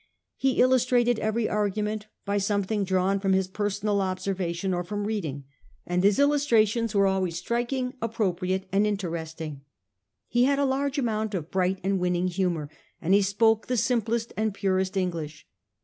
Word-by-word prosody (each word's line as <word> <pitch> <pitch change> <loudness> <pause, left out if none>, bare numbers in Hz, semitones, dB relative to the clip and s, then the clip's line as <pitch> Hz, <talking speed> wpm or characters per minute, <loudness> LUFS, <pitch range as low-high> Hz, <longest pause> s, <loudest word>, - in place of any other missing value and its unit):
He 270 -1 +1
illustrated 250 -2 +3
every 220 +1 0
argument 210 +1 -1 0.2
by 200 0 0
something 200 +1 0
drawn 190 +1 +1
from 195 -1 +1
his 190 0 +2
personal 205 +1 -1
observation 185 -1 -2
or 175 0 -1
from 205 +3 -4
reading, 165 -11 -3 0.4
and 180 +1 0
his 200 0 +4
illustrations 235 -6 +2
were 200 0 +4
always 190 -3 0
striking, 240 +6 -2
appropriate 190 -4 -1
and 200 +2 +3
interesting. 165 -7 -4 0.7
He 240 +2 +3
had 280 +1 +2
a 280 - +2
large 275 +1 0
amount 220 -5 -1
of 165 -3 -5
bright 185 0 +1
and 195 0 +1
winning 180 0 +1
humour, 175 -4 -1 0.3
and 175 +4 +1
he 200 - +6
spoke 215 +3 +2
the 250 - 0
simplest 230 -1 0
and 215 -2 -1
purest 190 -1 0
English. 165 -5 -3
200 Hz, 155 wpm, -26 LUFS, 185-225 Hz, 0.7 s, he